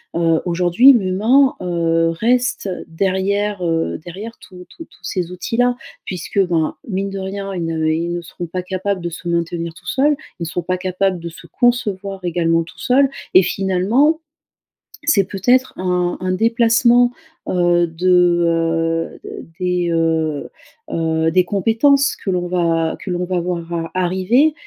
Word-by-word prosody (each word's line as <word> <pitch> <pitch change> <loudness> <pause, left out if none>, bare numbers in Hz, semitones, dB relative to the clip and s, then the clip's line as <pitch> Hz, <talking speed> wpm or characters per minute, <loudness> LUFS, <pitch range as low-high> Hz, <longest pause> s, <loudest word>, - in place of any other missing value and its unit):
Heu, 165 -1 +2
aujourd'hui 180 +9 +5
l'humain, 230 +7 +3
heu, 165 -2 +1
reste 240 +3 0 0.2
derrière, 195 +3 -1
heu 165 0 -1
derrière 205 +7 -8
tous 180 -1 -13
tous 330 - -11
tous - - -24
ces 180 -2 -3
outils 180 +5 -4
là 245 0 +3 0.3
puisque, 185 +2 -4
ben, 165 -3 0
mine 195 -1 -2
de 195 0 -5
rien 195 +1 -5
ils 170 - -2
ne 160 -1 -1
ils 165 +2 0
ne 175 - -3
seront 175 +1 -7
pas 180 +2 -4
capables 190 +1 -3
de 170 - -3
se 175 +1 -8
maintenir 170 0 -2
tout 155 - -17
seul, 285 +3 +2 0.3
ils 170 - -3
ne - - -2
seront 165 +2 -3
pas 185 +2 -1
capables 185 0 -1
de 170 0 -6
se 165 - -13
concevoir 200 -6 -1
également 165 -1 +1
tout 165 - -15
seul, 270 +2 +3 0.2
et 185 - +8
finalement, 195 - +1 0.8
c'est 265 -9 +3
peut-être 250 +7 +2
un 180 -1 0
un 185 0 -2
déplacement, 235 +3 +3 0.4
heu, 175 -1 +2
de, 175 +1 +3
heu 165 0 0 0.4
des 180 -1 0
heu 160 -2 0 0.4
heu, 160 0 0
des 185 +1 +4
compétences 225 +9 +2
que - - -6
l'on 180 -1 -1
va 165 -2 0
que 190 - -6
l'on 180 0 -1
va 180 0 -1
voir 170 -1 -4
a 165 -1 -3
arriver 190 - +2
180 Hz, 160 wpm, -19 LUFS, 170-205 Hz, 0.8 s, et